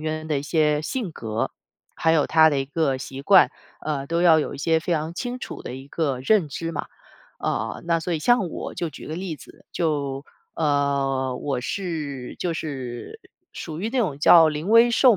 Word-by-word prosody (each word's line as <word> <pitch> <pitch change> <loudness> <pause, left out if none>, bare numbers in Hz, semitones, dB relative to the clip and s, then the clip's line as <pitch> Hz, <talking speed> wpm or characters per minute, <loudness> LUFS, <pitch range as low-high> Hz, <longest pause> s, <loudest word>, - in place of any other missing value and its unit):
员 155 0 -3
的 150 -2 +1
一 - - -7
些 150 -1 +1
性 205 +1 -3
格， 110 -5 -3 0.4
还 160 - +1
有 155 -3 +3
他 160 -1 +6
的 145 - 0
一 135 - 0
个 140 -1 0
习 135 +1 -7
惯， 190 +4 +6 0.4
嗯， 145 -3 -1
都 170 +1 0
要 165 -3 +6
有 - - -3
一 - - -9
些 160 +3 +2
非 175 - -2
常 160 +1 -2
清 245 +6 -4
楚 - - -7
的 - - -6
一 135 +1 -10
个 145 -4 -1
认 175 +4 +3
知 165 +4 -4
嘛。 155 - -4 0.5
呃， - - -2
那 170 -1 +2
所 175 +2 -3
以 165 - 0
像 225 +2 +3
我 - - -6
就 170 -2 -3
举 150 - -10
个 155 - -4
例 180 -3 -4
子， - - -16
就 145 -4 -1 0.3
呃， 140 -3 0
我 135 -1 -2
是， 150 -5 -4
就 175 - -1
是， 135 - -6 0.3
属 160 -1 -6
于 210 - -1
那 265 - -1
种 180 - 0
叫 160 +2 +7
临 155 +3 -3
危 230 +2 +6
受 235 -1 +5
155 Hz, 220 characters per minute, -24 LUFS, 140-170 Hz, 0.5 s, 叫